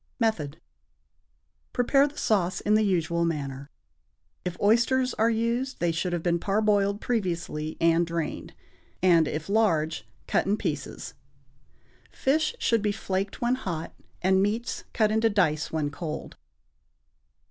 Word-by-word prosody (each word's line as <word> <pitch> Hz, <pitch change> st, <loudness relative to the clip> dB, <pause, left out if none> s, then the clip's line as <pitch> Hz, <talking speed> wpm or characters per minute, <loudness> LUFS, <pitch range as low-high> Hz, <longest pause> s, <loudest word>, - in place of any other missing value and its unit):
Method. 165 Hz, -, -1 dB, 1.1 s
Prepare 275 Hz, +3 st, +4 dB
the 290 Hz, -, -12 dB
sauce 185 Hz, -4 st, +1 dB
in 210 Hz, -, +1 dB
the 215 Hz, -, +5 dB
usual 170 Hz, -4 st, +1 dB
manner. 140 Hz, -4 st, -3 dB, 0.7 s
If 180 Hz, -1 st, -4 dB
oysters 240 Hz, +4 st, +3 dB
are 225 Hz, +1 st, +2 dB
used, 235 Hz, +4 st, -1 dB
they 175 Hz, -1 st, +1 dB
should 170 Hz, +2 st, -2 dB
have 175 Hz, -2 st, -2 dB
been 170 Hz, -1 st, +1 dB
parboiled 205 Hz, +1 st, +1 dB
previously 170 Hz, -9 st, -2 dB
and 165 Hz, +1 st, +4 dB
drained, 165 Hz, -2 st, -4 dB, 0.5 s
and, 170 Hz, -4 st, +5 dB
if 155 Hz, +1 st, -4 dB
large, 160 Hz, -, +1 dB, 0.2 s
cut -, -, +1 dB
in 205 Hz, +2 st, +2 dB
pieces. -, -, -4 dB, 1.0 s
Fish 315 Hz, -, 0 dB
should 230 Hz, -, +2 dB
be 210 Hz, 0 st, +1 dB
flaked 195 Hz, -1 st, -3 dB
when 240 Hz, +1 st, +2 dB
hot, 175 Hz, -11 st, -4 dB, 0.3 s
and 190 Hz, +1 st, +4 dB
meats 215 Hz, +4 st, -1 dB
cut 215 Hz, -2 st, +2 dB
into 220 Hz, +1 st, +3 dB
dice 160 Hz, -7 st, +1 dB
when 150 Hz, -2 st, -1 dB
cold. 155 Hz, 0 st, -6 dB
195 Hz, 135 wpm, -27 LUFS, 165-220 Hz, 1.1 s, the